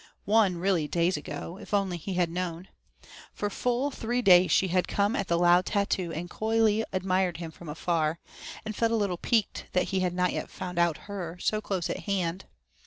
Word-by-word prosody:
Won, 205 Hz, -3 st, +3 dB
really, 175 Hz, -4 st, +1 dB
days 170 Hz, +3 st, +1 dB
ago, 170 Hz, +4 st, -6 dB
if 210 Hz, -, -3 dB
only 195 Hz, -3 st, 0 dB
he 185 Hz, +3 st, -5 dB
had 175 Hz, -2 st, +1 dB
known. 175 Hz, 0 st, -4 dB, 0.7 s
For 205 Hz, 0 st, -2 dB
full 250 Hz, +6 st, 0 dB
three 245 Hz, 0 st, -2 dB
days 180 Hz, -2 st, +7 dB
she 190 Hz, -, +3 dB
had 180 Hz, +1 st, +1 dB
come 205 Hz, +4 st, +1 dB
at 235 Hz, -, -1 dB
the 170 Hz, -, +2 dB
loud 175 Hz, +1 st, +4 dB
tattoo 195 Hz, -4 st, 0 dB
and 170 Hz, +2 st, -4 dB
coyly 220 Hz, +2 st, +1 dB
admired 185 Hz, -1 st, 0 dB
him 165 Hz, -2 st, -6 dB
from 165 Hz, 0 st, -11 dB
afar, 160 Hz, 0 st, 0 dB, 0.5 s
and 215 Hz, -1 st, -4 dB
felt 230 Hz, +1 st, +1 dB
a -, -, +2 dB
little 200 Hz, -5 st, 0 dB
piqued 220 Hz, +3 st, 0 dB
that 180 Hz, -, +1 dB
he 190 Hz, -, 0 dB
had 180 Hz, -1 st, 0 dB
not 180 Hz, 0 st, +1 dB
yet -, -, -4 dB
found 180 Hz, -2 st, -5 dB
out 170 Hz, -2 st, +3 dB
her, 180 Hz, -4 st, -5 dB
so 215 Hz, +3 st, 0 dB
close 190 Hz, -5 st, -2 dB
at -, -, -5 dB
hand. 190 Hz, -3 st, -1 dB
185 Hz, 200 wpm, -28 LUFS, 175-205 Hz, 0.7 s, days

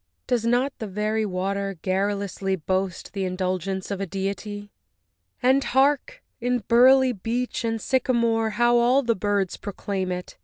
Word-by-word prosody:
Does 235 Hz, -3 st, 0 dB
not 250 Hz, +4 st, +2 dB
the 220 Hz, -, -4 dB
very 210 Hz, +2 st, -1 dB
water 195 Hz, +1 st, -2 dB
garrulously 195 Hz, +1 st, -1 dB
Boast 185 Hz, +1 st, -3 dB
the 195 Hz, -1 st, -2 dB
indulgence 185 Hz, +1 st, -2 dB
of 200 Hz, -1 st, -3 dB
a 195 Hz, -, -2 dB
deity? 200 Hz, +2 st, -4 dB, 0.7 s
And 265 Hz, +2 st, +4 dB
hark! 275 Hz, +2 st, +1 dB, 0.2 s
in 245 Hz, -1 st, -1 dB
burly 260 Hz, +2 st, +6 dB
beech 240 Hz, +4 st, -3 dB
and 225 Hz, -1 st, -1 dB
sycamore 235 Hz, -2 st, +1 dB
How 240 Hz, 0 st, +4 dB
all 250 Hz, +4 st, +4 dB
the 235 Hz, -1 st, +2 dB
birds 200 Hz, -1 st, -1 dB
proclaim 195 Hz, -2 st, -4 dB
it! 180 Hz, 0 st, -6 dB
205 Hz, 145 wpm, -24 LUFS, 190-240 Hz, 0.7 s, burly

